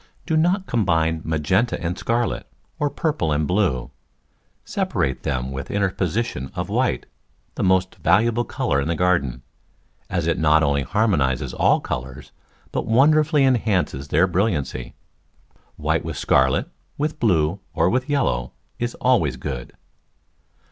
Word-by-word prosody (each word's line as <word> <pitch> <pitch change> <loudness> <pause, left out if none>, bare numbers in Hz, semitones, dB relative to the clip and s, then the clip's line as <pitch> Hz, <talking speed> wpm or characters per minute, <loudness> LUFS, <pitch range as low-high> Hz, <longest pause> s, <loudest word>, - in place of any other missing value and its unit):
Do 160 - 0
not 180 +5 +2
combine 80 - +1
magenta 80 +9 0
and 85 0 -2
scarlet, 115 +3 -1 0.3
or 145 - +1
purple 145 - -1
and 75 +1 +1
blue. 90 - 0 0.7
Separate 65 -1 -1
them 65 -1 -2
by 65 - -3
the - - -7
interposition 95 - -1
of - - -3
white - - 0 0.3
— - - -41
the - - -5
most 95 0 +2
valuable 115 +6 +3
colour 70 -10 -1
in 70 - -2
the 85 - 0
garden, 75 -9 0 0.7
as 85 -3 -1
it 85 -1 0
not 80 0 +4
only 70 -1 +2
harmonises 70 - +1
all - - +3
colours 65 +1 -6 0.4
but - - -2
wonderfully 150 +4 +4
enhances 100 - +1
their 80 +5 +3
brilliancy. 85 - -1 0.8
White - - 0
with - - -5
scarlet, - - +2 0.3
with 155 +1 -2
blue, 90 -4 +2 0.2
or - - +3
with 130 +8 0
yellow 65 - 0 0.3
is 120 0 -2
always 120 - +2
good. 65 -5 -5
90 Hz, 140 wpm, -22 LUFS, 70-120 Hz, 0.8 s, not